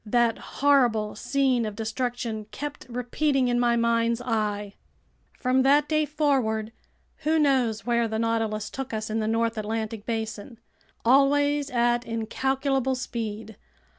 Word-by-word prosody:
That 235 +1 +1
horrible 245 -7 +2
scene 255 +1 +1
of 215 -2 -4
destruction 225 0 -3
kept 290 +7 -7
repeating 250 +2 0
in 240 0 +1
my 240 -1 +3
mind's 235 0 +1
eye. 210 -4 -2 0.6
From 255 0 +2
that 285 +3 +4
day 310 -1 +2
forward, 260 -8 0 0.5
who 315 +1 +1
knows 255 -8 +2
where 235 -1 +2
the 220 0 -3
Nautilus 225 -2 -1
took 265 -3 -5
us 215 0 -4
in 220 - 0
the 215 - -1
north 230 0 0
Atlantic 220 0 -4
basin? 225 0 -4 0.5
Always 285 +3 +3
at 240 -1 +1
incalculable 265 +3 -1
speed! 220 -4 -5
235 Hz, 135 wpm, -26 LUFS, 220-265 Hz, 0.6 s, that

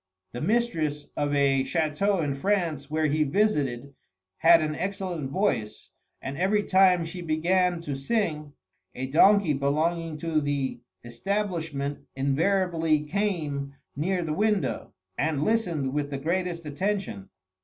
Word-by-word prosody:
The 120 - -6
mistress 160 -8 0
of 145 0 0
a 135 -1 +3
chateau 165 +6 0
in 145 -2 -1
France 160 -3 -1
where 155 +1 0
he 155 +1 +1
visited 140 - 0 0.4
had 165 +1 +6
an 155 -1 -1
excellent 180 -4 -3
voice, 135 - -2 0.3
and 135 +1 -5
every 205 +3 +2
time 185 -3 +4
she 175 +2 -7
began 175 +2 +1
to 145 -4 -4
sing, 150 -2 -2 0.4
a 130 - -3
donkey 175 +5 +5
belonging 155 +4 0
to 155 0 0
the 140 -3 -2 0.2
establishment 160 - -3 0.2
invariably 160 +3 +1
came 150 -6 -2 0.2
near 175 +5 0
the 155 -2 -2
window, 210 +2 0 0.3
and 150 -1 0
listened 170 -12 0
with 145 -1 -1
the 140 - -3
greatest 170 +3 -2
attention. 180 - -3
160 Hz, 130 wpm, -26 LUFS, 145-185 Hz, 0.4 s, had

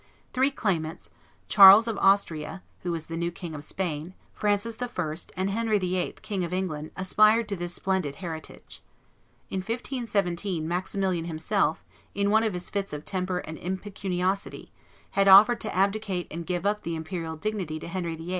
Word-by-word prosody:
Three 265 +2 +3
claimants, 170 - -2 0.4
Charles 200 +3 +9
of 225 - -1
Austria, 190 -3 +1 0.2
who 175 - -3
was 165 -2 -3
the 165 - -6
new 170 +1 -1
King 175 -1 -8
of 150 -1 -7
Spain, 170 0 -4 0.2
Francis 210 +2 0
I., 180 -11 -2 0.2
and 190 +1 0
Henry 220 0 +1
VIII., 185 -1 -1
King 195 -4 -2
of 170 - -4
England, 160 -5 -3
aspired 215 +4 +4
to 200 - -1
this 175 -1 -4
splendid 190 -7 -1
heritage. 160 -2 -8 0.7
In 190 - -1
1517, 200 - -2
Maximilian 180 0 -1
himself, 165 +2 0 0.3
in 200 0 +1
one 220 +1 +5
of 220 -4 -1
his 180 0 -5
fits 200 -3 -2
of 150 0 -6
temper 185 -1 -1
and 160 0 -8
impecuniosity, 190 0 -3 0.4
had 195 0 +2
offered 210 +5 +8
to - - -3
abdicate 195 -1 0
and 170 +1 -6
give 180 0 -2
up 210 +1 +1
the 170 0 -3
imperial 160 0 -5
dignity 180 -3 -3
to - - -8
Henry 170 -1 -3
VIII. 165 +2 -8
185 Hz, 165 wpm, -27 LUFS, 170-200 Hz, 0.7 s, Charles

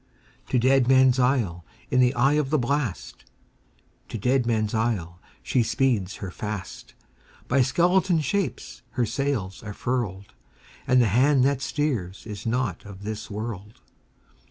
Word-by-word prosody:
To 130 - +2
Deadman's 130 0 +4
Isle, 120 -10 +1 0.3
in 125 - +3
the 125 +1 +4
eye 135 +4 +3
of 150 -3 +1
the 155 - +2
blast, 130 -5 -2 0.9
To - - -4
Deadman's 115 -2 +1
Isle, 105 -7 -1 0.2
she 125 - +1
speeds 115 -5 0
her 95 -3 -6
fast; 105 -2 -7 0.5
By 135 - +3
skeleton 175 +7 +3
shapes 150 -2 -3 0.2
her 120 - +3
sails 115 -6 -2
are 105 -2 -7
furled, 105 -6 -3 0.5
And 125 -2 +5
the - - +2
hand 130 +5 +4
that 140 -1 +1
steers 125 - -2
is 105 0 -7
not 115 -5 -1
of 100 -1 -11
this 110 +1 -5
world! 105 0 -6
120 Hz, 135 wpm, -25 LUFS, 105-135 Hz, 0.9 s, And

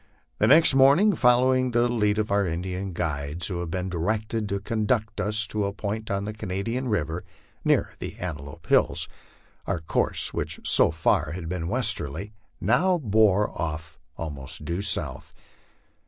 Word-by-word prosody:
The 105 - +4
next 155 +4 +6
morning, 140 +11 +5
following 130 0 +3
the 120 0 +2
lead 105 -3 +1
of 105 -1 -1
our 100 -1 +2
Indian 90 +3 -4
guides, 80 -1 -2
who 90 0 -1
had 85 -1 -4
been 90 +2 -3
directed 105 +5 -2
to 100 - -1
conduct 110 +1 -1
us 105 +1 -1
to 105 -1 -2
a 100 - -2
point 110 +1 -4
on 100 0 -1
the 105 - -4
Cana 95 -2 -4
dian 125 +4 -2
river 85 -4 -1 0.4
near - - +2
the - - -6
Antelope 75 -6 -7
Hills, - - +2 0.6
our 85 - -1
course, 80 - +1
which - - -4
so - - +5
far 80 -1 +1
had 85 -2 -6
been 85 -1 -3
westerly, 105 - -1 0.3
now 175 - +2
bore 105 - +3
off 80 0 -5 0.2
almost 75 -2 -6
due 85 +4 -2
south. - - -1
100 Hz, 160 wpm, -25 LUFS, 85-115 Hz, 0.6 s, next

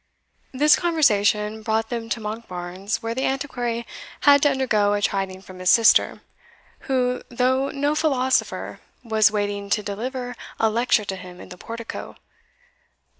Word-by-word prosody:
This 295 +3 +5
conversation 215 - +2
brought 220 0 -1
them 230 -2 -4
to 230 - -2
Monkbarns, 200 -2 -5
where 230 0 -2
the 260 - -3
Antiquary 245 -4 -3 0.4
had 285 -1 +6
to 290 - +5
undergo 225 -7 +1
a 205 - -2
chiding 190 -1 -2
from 185 -1 -12
his 185 0 +1
sister, 230 -1 +5 0.7
who, 250 -1 +1
though 260 +3 +1
no 285 +2 0
philosopher, 265 -4 0 0.2
was 220 -2 +3
waiting 205 -1 -3
to 210 +1 +1
deliver 245 +5 -5 0.2
a 220 -1 +3
lecture 230 -1 +2
to 195 - -3
him 180 -1 -11
in - - -11
the 180 - -10
portico. 230 0 -7
225 Hz, 145 wpm, -23 LUFS, 205-260 Hz, 0.7 s, had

